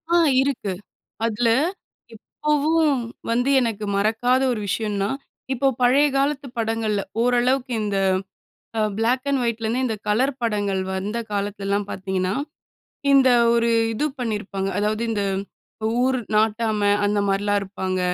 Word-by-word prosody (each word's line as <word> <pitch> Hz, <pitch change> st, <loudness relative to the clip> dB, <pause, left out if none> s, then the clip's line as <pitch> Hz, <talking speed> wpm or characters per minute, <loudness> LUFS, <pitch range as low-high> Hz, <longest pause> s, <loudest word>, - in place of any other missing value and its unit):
ஆ -, -, +6 dB, 0.2 s
இருக்கு. 265 Hz, -8 st, -1 dB, 0.5 s
அதில 230 Hz, +1 st, 0 dB, 0.7 s
இப்போவும் 300 Hz, +3 st, +1 dB, 0.3 s
வந்து 245 Hz, +3 st, +1 dB
எனக்கு 220 Hz, -4 st, -1 dB
மறக்காத 225 Hz, +5 st, +2 dB
ஒரு 230 Hz, -, -2 dB
விஷயம்னா, 205 Hz, -1 st, -1 dB, 0.4 s
இப்போ 270 Hz, +2 st, +1 dB
பழைய 270 Hz, +4 st, +5 dB
காலத்து 280 Hz, 0 st, 0 dB
படங்கள்ல 220 Hz, -2 st, 0 dB, 0.2 s
ஓரளவுக்கு 250 Hz, +2 st, +2 dB
இந்த 205 Hz, -1 st, -1 dB, 0.8 s
அ -, -, +2 dB, 0.2 s
பிளாக் 245 Hz, +4 st, +1 dB
அண்ட் 275 Hz, -2 st, +1 dB
வைட்ல 230 Hz, -1 st, -1 dB
இருந்து, 235 Hz, +4 st, 0 dB
இந்த 225 Hz, -3 st, -1 dB
கலர் 250 Hz, +7 st, +2 dB
படங்கள் 205 Hz, -4 st, 0 dB
வந்த 205 Hz, +4 st, -3 dB
காலத்திலலாம் 200 Hz, 0 st, -2 dB
பார்த்தீங்கன்னா, 190 Hz, -1 st, -2 dB, 0.8 s
இந்த 270 Hz, -1 st, +6 dB, 0.3 s
ஒரு 235 Hz, 0 st, +2 dB, 0.2 s
இது 295 Hz, +8 st, 0 dB
பண்ணிருப்பாங்க. 205 Hz, -5 st, -3 dB
அதாவது, 215 Hz, +2 st, 0 dB
இந்த 210 Hz, -2 st, -1 dB, 0.8 s
ஊர் 260 Hz, 0 st, +2 dB, 0.2 s
நாட்டாம 215 Hz, -1 st, +2 dB
அந்த 205 Hz, 0 st, +1 dB
மாரிலாம் 205 Hz, +1 st, +1 dB
இருப்பாங்க. 190 Hz, -1 st, -3 dB
225 Hz, 120 wpm, -23 LUFS, 205-255 Hz, 0.8 s, ஆ